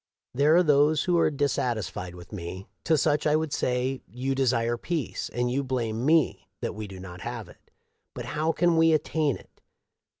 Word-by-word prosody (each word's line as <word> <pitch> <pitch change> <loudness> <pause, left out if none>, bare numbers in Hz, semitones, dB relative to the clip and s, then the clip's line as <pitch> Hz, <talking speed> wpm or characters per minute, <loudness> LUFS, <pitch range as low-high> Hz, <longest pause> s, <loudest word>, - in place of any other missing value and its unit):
" - - -65
There 145 +5 +4
are 180 - +6
those 150 0 +4
who 175 -2 +2
are - - +4
dissatisfied 120 - -2
with 90 0 -12
me. 95 0 -6 0.2
To 160 - +4
such 150 +1 +2
I 150 - +4
would 155 -2 -1
say: 130 +1 0
You 125 +6 -2
desire 120 -3 +1
peace; 155 +4 -3
and 120 0 -1
you 140 +2 0
blame 120 -2 -2
me 130 - +2
that - - -2
we 105 0 -6
do 95 -1 -10
not 90 -1 -9
have - - -5
it. - - -19 0.5
I5ut - - -5
how 155 +2 0
can 170 0 +2
we 165 0 +5
attain 155 -2 +1
it - - -21
135 Hz, 195 wpm, -27 LUFS, 115-155 Hz, 0.5 s, are